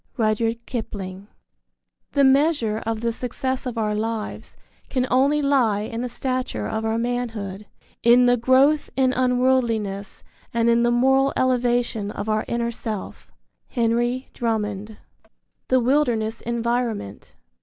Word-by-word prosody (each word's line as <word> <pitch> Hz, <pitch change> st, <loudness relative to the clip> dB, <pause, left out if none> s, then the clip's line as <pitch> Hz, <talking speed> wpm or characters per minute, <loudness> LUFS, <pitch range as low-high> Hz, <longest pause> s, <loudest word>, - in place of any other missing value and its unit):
Rudyard 225 Hz, +1 st, 0 dB
Kipling. 200 Hz, -5 st, -6 dB, 0.9 s
The 280 Hz, -, +3 dB
measure 270 Hz, -5 st, +3 dB
of 225 Hz, -1 st, -2 dB
the 235 Hz, 0 st, 0 dB
success 260 Hz, +2 st, -3 dB
of 240 Hz, -2 st, -5 dB
our 215 Hz, -2 st, 0 dB
lives 220 Hz, 0 st, -4 dB, 0.3 s
can 255 Hz, -2 st, 0 dB
only 280 Hz, +4 st, +3 dB
lie 245 Hz, -8 st, +2 dB
in 225 Hz, +2 st, -4 dB
the 250 Hz, -, -3 dB
stature 255 Hz, -, -3 dB
of 220 Hz, -, -3 dB
our 225 Hz, 0 st, 0 dB
manhood, 225 Hz, -5 st, -3 dB, 0.3 s
in 240 Hz, +1 st, +6 dB
the 245 Hz, 0 st, +5 dB
growth 260 Hz, +5 st, +3 dB
in 260 Hz, -1 st, +3 dB
unworldliness 245 Hz, -6 st, 0 dB, 0.3 s
and 235 Hz, 0 st, +3 dB
in 235 Hz, 0 st, +3 dB
the 240 Hz, -, +3 dB
moral 265 Hz, +3 st, +3 dB
elevation 245 Hz, -4 st, +1 dB
of 210 Hz, -, -5 dB
our 215 Hz, 0 st, 0 dB
inner 235 Hz, 0 st, -1 dB
self. 220 Hz, -3 st, -6 dB, 0.4 s
Henry 240 Hz, +1 st, 0 dB
Drummond. 210 Hz, -3 st, -2 dB, 0.3 s
I. -, -, -28 dB, 0.4 s
THE 255 Hz, -, +3 dB
WILDERNESS 240 Hz, -4 st, +1 dB
ENVIRONMENT. 235 Hz, -, -2 dB
235 Hz, 135 wpm, -23 LUFS, 220-255 Hz, 0.9 s, in